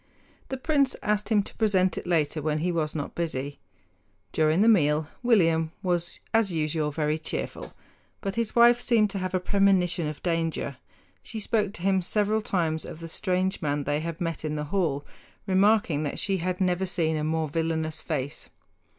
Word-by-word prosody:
The 265 - -3
prince 280 -1 +1
asked 210 0 0
him 210 -3 +3
to - - -11
present 190 -5 +2
it - - -6
later 155 -3 +1
when 150 0 0
he 175 +3 0
was 160 -2 -1
not 145 -2 -4
busy. 145 -4 -3 0.7
During 155 +3 +2
the 220 - +5
meal 155 -8 +4
William 165 -9 +3
was 175 -2 -1
as 225 -4 +3
usual 155 -1 0
very 150 +1 -1
cheerful; 160 - -5 0.5
but 195 -2 -3
his 230 -1 -2
wife 240 0 +6
seemed 220 -4 +3
to 195 - -3
have 185 0 -2
a - - +2
premonition 180 -4 +2
of 150 -1 -6
danger. 165 -5 -1 0.4
She 225 - -7
spoke 210 -1 0
to 170 - -9
him 190 -1 +3
several 210 +4 +1
times 165 -6 -1
of 160 - -8
the 165 - -7
strange 185 +3 -1
man 145 -2 -1
they 145 +1 0
had 165 0 -5
met 165 -4 -3
in 155 -1 -2
the 150 - -2
hall, 150 -7 0 0.4
remarking 195 -5 +3
that 145 -2 -3
she 195 -1 +1
had 180 +1 -2
never 185 0 +1
seen 160 -3 0
a 155 - -1
more 160 0 0
villainous 160 0 -2
face. 145 -3 -4
170 Hz, 185 wpm, -27 LUFS, 155-200 Hz, 0.7 s, wife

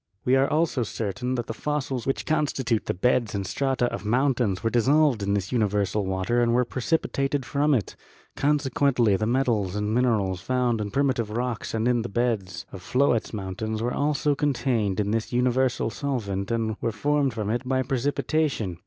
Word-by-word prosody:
We 125 - +4
are 135 +1 +3
also 155 -4 +1
certain 115 +3 -3
that 120 -2 -2
the - - -5
fossils 135 -5 -3
which 135 - -1
constitute 140 -7 0
the - - 0
beds 120 +2 +1
and 100 -1 -2
strata 135 +2 0
of 100 - -4
mountains 120 -3 +1
were 115 - +1
dissolved 135 0 +3
in 100 0 0
this 100 -1 -2
universal 105 -4 0
water 95 +6 0
and 120 0 +2
were 125 0 +3
precipitated 135 +1 -1
from 145 +2 +2
it; 110 -7 -2 0.4
consequently 140 -6 +2
the 110 +3 -1
metals 115 -7 +1
and 105 +1 -1
minerals 105 -7 +1
found 125 -1 0
in 105 - -3
primitive 130 -3 0
rocks 120 0 -3
and 110 +1 0
in 120 -1 +2
the 120 - -5
beds 100 -6 -1
of 95 - -9
floetz 125 +2 +1
mountains 110 +2 -4
were 120 +2 -1
also 145 0 +1
contained 125 -8 0
in 105 0 0
this 110 0 -1
universal 125 -1 +1
solvent 105 -9 -3
and 110 -2 -1
were 115 - 0
formed 140 +3 0
from 105 -2 -2
it 120 - 0
by 130 0 +1
precipitation. 135 - -1
120 Hz, 180 wpm, -25 LUFS, 105-135 Hz, 0.4 s, We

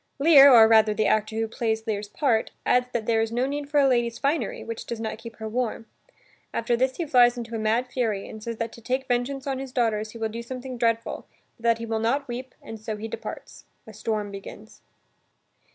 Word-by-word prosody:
Lear, 280 -2 +8
or 225 -3 +9
rather 220 -1 +5
the 215 - +1
actor 215 0 +1
who 225 0 0
plays 220 0 -2
Lear's 210 -2 -2
part, 230 -2 +1 0.2
adds 250 0 +3
that 230 -3 -2
there 225 -1 +2
is 225 0 -1
no 245 +2 0
need 285 +1 -4
for 295 0 +3
a 275 - +5
lady's 240 -2 +1
finery, 280 -5 -1
which 230 -1 -6
does 235 - -4
not 220 -1 -4
keep 230 -1 -10
her 220 0 -6
warm. 230 0 -2 0.7
After 235 +1 +1
this 260 +2 0
he 340 - -2
flies 245 -4 +5
into 235 -1 -6
a - - -2
mad 220 +3 +1
fury 230 -6 -2
and 220 - -9
says 230 +1 -5
that 230 0 -4
to 235 - -13
take 255 +3 -2
vengeance 260 +2 -1
on 270 -2 -2
his 270 -1 -6
daughters 220 -4 0
he 230 - -10
will 225 -1 -2
do 230 +2 -6
something 255 +1 -7
dreadful 230 -1 -1 0.3
but 230 - -22
that 230 -1 +4
he 230 - -6
will 225 -1 -2
not 270 +6 0
weep, 250 +1 -7
and 225 0 -8
so 220 0 -5
he 220 +2 -5
departs. - - -8 0.2
A 220 - -12
storm 215 -1 -3
begins. 200 +2 -11
230 Hz, 230 wpm, -25 LUFS, 220-255 Hz, 0.7 s, or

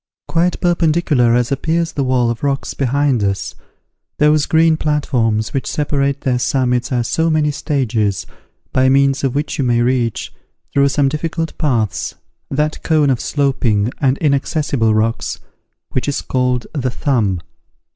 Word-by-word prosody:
Quite 175 +2 +1
perpendicular 160 -8 +2
as 120 +1 +1
appears 165 +4 0
the 140 - -2
wall 125 -2 +1
of 120 - -6
rocks 140 -1 -1
behind 135 -3 +1
us, 100 -1 -2 0.6
those 150 0 +3
green 160 0 +4
platforms 125 -8 0
which 135 - -2
separate 140 -2 -1
their 125 -2 0
summits 125 -1 0
are 120 -2 +1
so 160 +8 0
many 155 -2 +2
stages, 120 - -1 0.5
by 130 0 +3
means 135 0 +3
of 135 -1 0
which 145 +1 -2
you - - +2
may 120 -2 +2
reach, 120 -3 -1 0.4
through 140 0 +4
some 140 0 +2
difficult 165 +3 -3
paths, 115 - -1 0.3
that 150 +2 -1
cone 155 -4 +2
of 125 - 0
sloping 125 -6 0
and 135 -2 +2
inaccessible 140 -5 +1
rocks, 115 +1 -1 0.5
which 130 - -2
is 145 - -1
called 125 -1 0
The 135 -4 -1
Thumb. 115 -8 0
135 Hz, 145 wpm, -17 LUFS, 120-150 Hz, 0.6 s, green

